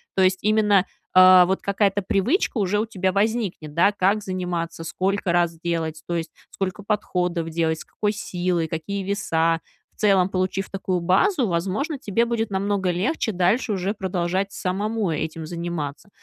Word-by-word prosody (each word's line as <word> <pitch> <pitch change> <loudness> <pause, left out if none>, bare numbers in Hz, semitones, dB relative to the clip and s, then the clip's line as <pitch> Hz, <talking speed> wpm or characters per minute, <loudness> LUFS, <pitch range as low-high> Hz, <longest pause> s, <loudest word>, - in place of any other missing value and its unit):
То 190 - +3
есть 185 0 +3
именно, 210 -3 +3 0.3
а, 185 0 +8
вот 190 +2 -1
какая-то 200 0 +1
привычка 225 - +1
уже 205 +1 +1
у 220 - 0
тебя 190 -4 -1
возникнет, 200 -7 -1
да? 170 +5 +4
Как 205 +1 +1
заниматься, 180 -4 -4
сколько 190 +2 -1
раз 170 -1 +1
делать, 160 -2 -3
то 175 - -2
есть 165 -1 -3 0.2
сколько 195 +1 -4
подходов 180 -5 -1
делать, 160 -1 0
с - - -10
какой 210 -1 -1
силой, 180 -5 -2
какие 190 +6 -4
веса. 165 -4 0 0.4
В - - -42
целом, 195 -3 +4
получив 185 +1 -1
такую 190 -2 -2
базу, 230 - +2
возможно, 195 - -1
тебе 230 -2 0
будет 230 -2 -2
намного 195 -1 0
легче 215 - -1
дальше 185 +6 +1
уже 195 +2 -1
продолжать 190 0 -1
самому 205 +3 -2
этим 160 +1 -3
заниматься. 170 -1 -5
185 Hz, 160 wpm, -23 LUFS, 175-205 Hz, 0.4 s, а